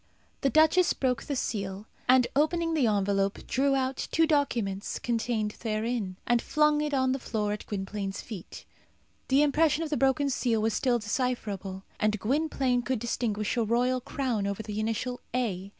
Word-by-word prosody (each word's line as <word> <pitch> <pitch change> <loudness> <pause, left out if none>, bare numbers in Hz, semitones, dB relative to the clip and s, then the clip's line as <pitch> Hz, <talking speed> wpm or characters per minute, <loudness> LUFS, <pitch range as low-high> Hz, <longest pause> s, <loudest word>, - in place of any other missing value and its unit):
The 275 - +3
duchess 315 +5 +4
broke 250 -3 0
the 285 - -4
seal, 200 -5 -3 0.2
and, 255 -1 +6
opening 330 +3 +2
the 285 -7 +3
envelope, 200 -1 0
drew 275 +1 +2
out 265 0 -1
two 325 - +4
documents 235 - 0
contained 225 -2 -1
therein, 220 -3 -2
and 240 -1 +2
flung 300 0 +2
it 300 0 -1
on 260 -2 +2
the 265 - -1
floor 210 -4 -2
at 210 - -7
Gwynplaine's 195 0 -4
feet. 205 -7 -9 0.6
The 275 +2 +4
impression 310 +1 +2
of 315 - -5
the 295 - +1
broken 270 +1 +2
seal 235 -3 +1
was 220 0 +1
still 245 -2 +2
decipherable, 210 -5 -3 0.2
and 215 0 +1
Gwynplaine 265 0 +1
could 255 +1 -1
distinguish 215 -2 -1
a 235 - +3
royal 250 +3 +1
crown 240 -7 -2
over 200 +2 -3
the 210 -1 -4
initial 225 +3 -2 0.2
A. 200 -6 -1
240 Hz, 165 wpm, -28 LUFS, 210-270 Hz, 0.6 s, and